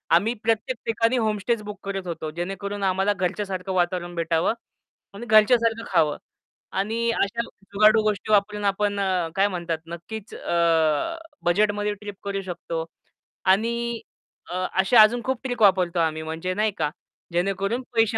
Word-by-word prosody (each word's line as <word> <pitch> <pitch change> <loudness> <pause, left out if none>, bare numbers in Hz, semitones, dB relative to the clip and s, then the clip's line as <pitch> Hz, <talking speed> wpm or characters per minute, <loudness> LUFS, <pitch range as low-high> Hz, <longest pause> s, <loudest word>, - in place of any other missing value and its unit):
आम्ही 215 +7 +3
प्रत्येक 225 +3 0
ठिकाणी 230 +2 +1
होमस्टेच 215 0 0
बुक 210 -1 -7
करत 195 -2 -4
होतो, 160 -2 -4
जेणेकरून 195 +4 -4
आम्हाला 190 +2 +2
घरच्यासारखं 190 0 -2
वातावरण 175 -1 0
भेटावं 165 +4 +1 0.6
आणि 210 +4 -8
घरच्यासारखं 230 +1 +4
खावं. 160 -5 +3 0.5
आणि 225 +4 -1
अशा 230 +4 0
जुगाडू 215 +3 +3
गोष्टी 215 0 -1
वापरून 210 0 +2
आपण 205 +1 +1
अ, 185 -4 0
काय 195 +1 +4
म्हणतात, 170 -4 -3
नक्कीच 190 +6 -8
अ, 165 - +1 0.3
बजेटमध्ये 205 +3 +2
ट्रिप 205 0 -8
करू 200 0 -2
शकतो. 170 -3 -4 0.6
आणि 230 +4 +1 0.5
अ, 185 0 -1
अशा 220 +4 +7
अजून 235 +3 +5
खूप 260 -2 -1
ट्रिक 245 -3 -3
वापरतो 185 -4 +4
आम्ही, 160 -1 0
म्हणजे 160 +3 -3
नाही 215 +2 +1
का, 150 -2 0 0.4
जेणेकरून 195 +6 0
पैसे 225 -1 +3
200 Hz, 140 wpm, -24 LUFS, 180-220 Hz, 0.6 s, अशा